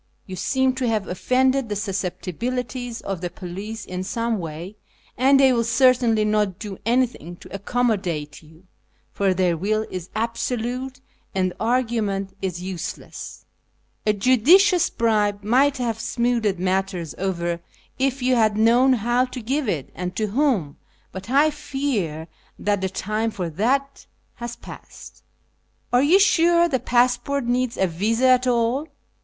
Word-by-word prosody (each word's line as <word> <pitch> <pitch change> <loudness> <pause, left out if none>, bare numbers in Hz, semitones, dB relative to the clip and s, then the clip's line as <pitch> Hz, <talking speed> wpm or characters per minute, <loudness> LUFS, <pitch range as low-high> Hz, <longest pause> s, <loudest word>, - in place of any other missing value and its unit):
You 185 - -7
seeiu 260 +7 +1
to 255 -2 0
have 215 -4 0
offended 260 +6 +1
the 205 - -2
susceptibilities 230 +5 -3
of 195 -3 -4
the 175 - -3
police 195 +5 -7
in 185 0 -5
some 230 +2 -1
way, 170 +4 -7 0.4
and 270 +2 +4
they 265 -1 +6
will 235 -1 +1
certainly 235 -2 +3
not 210 -3 +1
do 205 -3 -7
anything 235 - 0
to - - -14
accom 245 +5 -1
modate 165 -8 -3
you, 160 +2 -19 0.5
for 195 -2 +1
their 180 -2 +2
will 215 +6 -1
is 180 -1 -6
absolute, 240 +3 -3 0.3
and 185 -1 0
argument 220 -5 -1
is 180 -2 -3
useless. 185 -2 -7 0.6
A 210 - +3
judicious 315 - +4
bribe 210 -3 +1
might 265 +6 +3
have 230 -3 -2
smoothed 235 -4 0
matters 185 -2 -1
over 175 -3 -2 0.4
if 265 -1 0
you 255 +1 +3
had 215 -3 +2
known 240 +4 +5
how 240 +2 +1
to 255 0 -7
give 260 +2 -1
it 150 -8 -3
and 180 +1 -5
to 215 - 0
whom, 220 - 0 0.3
but 190 +3 -8
I 290 +4 +4
fear 265 - -3 0.3
that 205 -1 0
the 190 - -1
time 215 +4 -2
for 180 -6 -4
that 270 - -1 0.3
has 235 -1 -6
passed." - - -12 0.4
" - - -38
Are 245 - +5
you 325 +8 +5
sure 345 -3 +4
the 265 -6 0
passport 245 +3 +1
needs 245 0 0
a 190 - +3
visa 210 +8 0
at 255 0 +4
all 245 +5 +1
225 Hz, 150 wpm, -23 LUFS, 190-255 Hz, 0.6 s, they